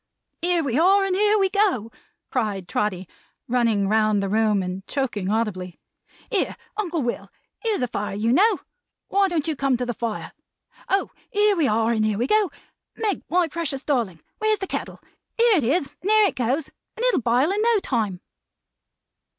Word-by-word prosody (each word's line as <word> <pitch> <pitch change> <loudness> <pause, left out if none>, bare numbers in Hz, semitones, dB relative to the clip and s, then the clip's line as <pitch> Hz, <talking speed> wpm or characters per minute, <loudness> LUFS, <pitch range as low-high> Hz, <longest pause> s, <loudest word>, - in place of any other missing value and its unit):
"Here 350 -1 +2
we 270 0 0
are, 390 +3 +5
and 380 -1 0
here 420 +2 +3
we 385 -2 +2
go!" 380 - +1 0.4
cried 205 -7 -1
Trotty, 190 -3 -2 0.4
running 230 -5 +2
round 215 -1 +2
the 195 - -2
room 210 -2 +2
and 185 +1 -5
choking 225 -9 -2
audibly. 200 -5 -2 0.5
"Here, 410 - 0 0.2
Uncle 350 -8 -2
Will, 240 - -3 0.3
here's 440 - -1
a - - +1
fire 205 -3 -4
you 225 +4 +1
know! 405 - +4 0.5
Why 395 0 +3
don't 335 -4 -1
you 315 - 0
come 270 -2 +1
to 250 - -2
the 240 - -2
fire? 230 -1 -4 0.6
Oh 390 0 +1 0.2
here 415 0 +3
we 320 -6 +2
are 225 +2 +2
and 220 -2 +1
here 215 -1 +1
we 240 - +1
go! 425 +4 +3 0.5
Meg, 425 -4 -1
my 355 0 +2
precious 300 -4 -3
darling, 225 - -1 0.2
where's 435 0 +2
the 385 - -4
kettle? - - -5 0.4
Here 465 -3 +5
it 300 - +1
is 280 +3 0
and 390 - -2
here 430 0 +6
it - - -10
goes, 260 +5 -1 0.3
and 475 - -1
it'll - - +3
bile 245 +8 +2
in 410 +2 0
no 465 0 +4
time!" 220 - -2
270 Hz, 185 wpm, -23 LUFS, -, 0.6 s, here